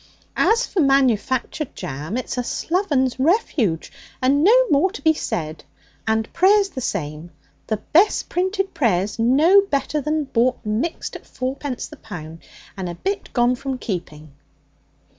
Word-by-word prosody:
'As 460 +3 +3
for 385 - -3
manufactured 270 0 +1
jam, 160 - -5
it's 255 - -4
a 250 - -1
sloven's 280 -5 0
refuge, 265 - +1 0.3
and 275 +3 +2
no - - +6
more 295 +7 +4
to 410 - -9
be 320 -1 +5
said. 155 - -4 0.4
And 220 0 0
prayer's 395 +2 +4
the 260 - -6
same. 155 -5 -4 0.4
The 215 - 0
best 350 - +2
printed 380 +2 -1
prayer's 205 -4 0
no 300 +12 +5
better 300 -5 -1
than 305 +2 0
bought 255 -1 +1
mixed 220 +11 -2
at - - -10
four 260 +1 -3
pence 275 -3 -5
the - - -12
pound, 165 -6 -9 0.4
and 185 -2 -4
a 175 - -6
bit 395 - -3
gone 240 0 +3
from 265 +1 -4
keeping.' 160 - -6
260 Hz, 150 wpm, -21 LUFS, 215-330 Hz, 0.4 s, no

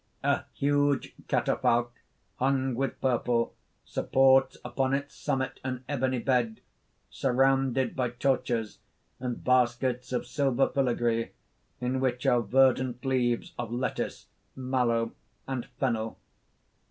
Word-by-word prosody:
_ - - -45
_... - - -38
A - - -9
huge 145 -1 +1
catafalque, 120 0 +1 0.5
hung 130 0 +1
with 135 +3 -2
purple, 120 -2 +1 0.3
supports 135 0 +3
upon 135 0 0
its 140 +1 -4
summit 130 0 -2
an 130 -1 -4
ebony 130 -2 0
bed, 120 -3 0 0.5
surrounded 135 -1 +2
by 125 -2 0
torches 120 -3 -1 0.4
and 125 -2 -4
baskets 125 0 +1
of 125 - -1
silver 135 -1 +1
filagree, 120 -3 0 0.5
in 125 +1 -1
which 125 -2 -1
are 120 -1 +4
verdant 130 +2 +2
leaves 125 -3 0
of 120 -2 -3
lettuce, 125 +2 -3 0.3
mallow 125 -3 0 0.4
and 130 -3 -3
fennel. 115 -4 -1
130 Hz, 115 wpm, -28 LUFS, 120-135 Hz, 0.5 s, are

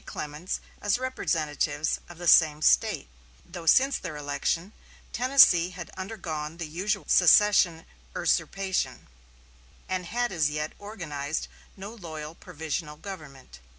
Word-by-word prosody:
Clements 150 +5 -5 0.2
as 205 +1 +2
representatives 155 - -1
from 175 - -12
the 175 0 -5
same 155 -2 +6
State, - - +3 0.4
though 170 -2 -9
since 265 - +5
their 160 -5 -6
election 150 +6 -2 0.4
Tennessee 245 -9 +5
had 180 -2 -9
undergone 165 -6 -5
the 170 - -4
usual 195 +6 -2
secession 180 -2 +5 0.3
usurpation, 190 -10 -1 0.8
and 185 -1 -3
had 240 +4 -1
as 160 -5 +1
yet 150 +1 -3
organized 160 -8 -4 0.3
no 200 +3 -8
loyal 160 -7 -8
provisional 160 -2 -5
government. 150 - -10
170 Hz, 120 wpm, -27 LUFS, 150-195 Hz, 0.8 s, same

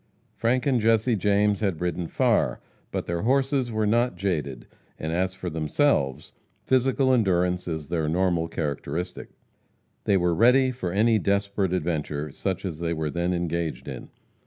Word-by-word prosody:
Frank 125 +2 0
and 130 -5 +2
Jesse 115 +2 +3
James 105 +1 +2
had 95 -7 -1
ridden 90 -1 -2
far, - - +1 0.3
but - - -3
their 85 0 -2
horses 135 +1 +1
were 110 -1 0
not 120 +2 +2
jaded, 75 -10 -2 0.3
and 80 - -4
as 95 +2 0
for 95 -1 -6
themselves, 75 - 0 0.3
physical 130 +1 +2
endurance 90 -6 +1
is 80 -3 -4
their 80 -3 0
normal 85 -1 +1
characteristic. 80 +2 -4 0.8
They 100 - +3
were 90 -1 +2
ready 125 +7 +4
for 95 -8 -4
any 110 +3 +3
desperate 100 -1 0
adventure, 75 -4 -2
such 95 +5 -3
as 85 -5 -4
they 85 0 -1
were 80 -2 -2
then 85 +3 -1
engaged 85 -2 -2
in. - - -7
90 Hz, 155 wpm, -25 LUFS, 85-110 Hz, 0.8 s, ready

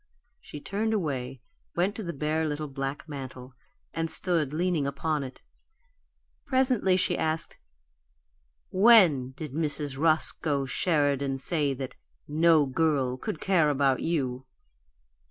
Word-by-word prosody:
She 150 - -9
turned 215 +7 -1
away, 135 -8 -3 0.3
went 185 +4 +1
to - - -5
the 175 -4 -4
bare 155 +1 -1
little 150 0 -3
black 140 +3 -5
mantel, 130 -3 -8 0.4
and 165 0 -2
stood 165 -7 0
leaning 165 -2 0
upon 150 +2 -1
it. 130 -1 -10 1.0
Presently 255 -8 +2
she 185 -1 +1
asked: 160 -1 -2 1.1
"WHEN 185 - +5
did 155 -3 -6
Mrs. 145 -2 -2
Roscoe 155 -2 +1
Sheridan 140 -2 +1
say 145 0 -1
that 130 0 -7 0.3
'no 155 0 +4
girl' 135 -2 +1
could 155 - -4
care 175 -6 +3
about 135 -2 +2
you?" 130 -6 -2
150 Hz, 120 wpm, -27 LUFS, 135-170 Hz, 1.1 s, WHEN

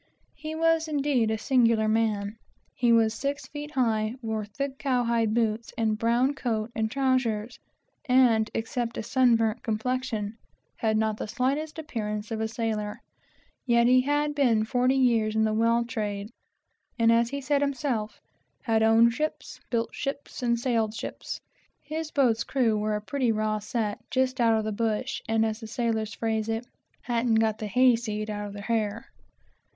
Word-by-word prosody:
He 310 +1 -6
was 330 0 +2
indeed 280 -6 +1
a 220 - 0
singular 230 -2 +3
man. 215 -1 0 0.4
He 240 -1 +2
was 225 -1 +4
six 280 +4 -3
feet 295 0 -7
high, 225 -5 0
wore 220 -1 -2
thick, 270 +6 -5
cowhide 235 -5 +1
boots, 225 -1 0
and 220 -2 +1
brown 240 +4 +2
coat 230 -4 -2
and 220 -1 0
trowsers, 250 -4 0 0.5
and, 245 -5 +4
except 230 +1 -2
a - - -3
sun 245 +1 +4
burnt 225 +1 0
complexion, 225 -1 -2 0.4
had 220 -1 +1
not 220 -1 0
the - - -4
slightest 275 +8 -1
appearance 215 -9 -4
of 220 -1 -2
a 220 - 0
sailor; 220 -2 -3 0.7
yet 235 -1 +4
he 255 +1 +5
had 290 +2 0
been 240 -7 +2
forty 250 +3 +2
years 230 -5 +2
in 220 - +3
the 215 0 +1
whale 230 +2 +2
trade, 210 -3 -4 0.7
and, 230 -1 +4
as 230 0 +3
he 280 - -3
said 280 +1 +1
himself, 255 -7 -2 0.4
had 225 -3 +2
owned 225 +1 +5
ships, 305 +5 -4
built 230 -1 -1
ships, 280 0 -5
and 235 -1 +1
sailed 230 -3 0
ships. - - -6 0.4
His 310 +2 -4
boat's 245 -7 +2
crew 240 -5 +1
were 210 0 0
a 210 - -3
pretty 255 +1 0
raw 215 0 0
set, 210 0 -2
just 260 0 0
out 225 -1 +4
of 220 - -1
the 215 - -2
bush, 215 0 -1
and 225 0 +3
as 220 0 -2
the 225 - -8
sailor's 225 -1 -2
phrase 220 -1 -1
is, 225 +2 -2 0.4
"hadn't 235 -1 +1
got 220 -1 +2
the 215 - -3
hayseed 225 -2 +2
out 205 0 -4
of 200 - -9
their 205 0 -8
hair." 225 -1 -1
230 Hz, 170 wpm, -27 LUFS, 220-255 Hz, 0.7 s, he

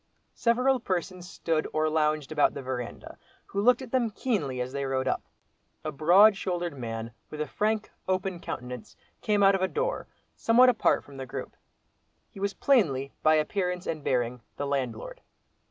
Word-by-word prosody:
Several 250 +3 +2
persons 185 -1 -3
stood 165 -5 -1
or 155 0 +2
lounged 155 -1 +1
about 150 -2 +3
the 140 - -5
verandah, 125 -2 -6 0.3
who 200 - -2
looked 250 +4 +4
at 250 - -10
them 250 -3 +2
keenly 195 - -2
as 125 +1 -3
they 140 0 -2
rode 135 -1 -1
up. - - 0 0.6
A 155 - -1
broad 180 +8 +6
shouldered 175 -4 -3
man 115 -2 -5 0.2
with 150 - -8
a 150 - 0
frank, 215 +5 -1 0.2
open 185 -1 -1
countenance, 125 -6 -7 0.3
came 205 -1 +2
out 195 0 +7
of 195 - 0
a 190 - +3
door, - - -2 0.3
somewhat 245 +3 +5
apart 240 - +2
from 140 -1 -13
the 130 -1 -6
group. - - -6 0.8
He - - -11
was 200 0 -1
plainly, 140 - +2
by 155 0 +5
appearance 180 +3 -1
and 155 -3 -3
bearing, 125 -1 0 0.2
the 145 - -2
landlord. 130 -5 -3
165 Hz, 170 wpm, -28 LUFS, 135-205 Hz, 0.8 s, out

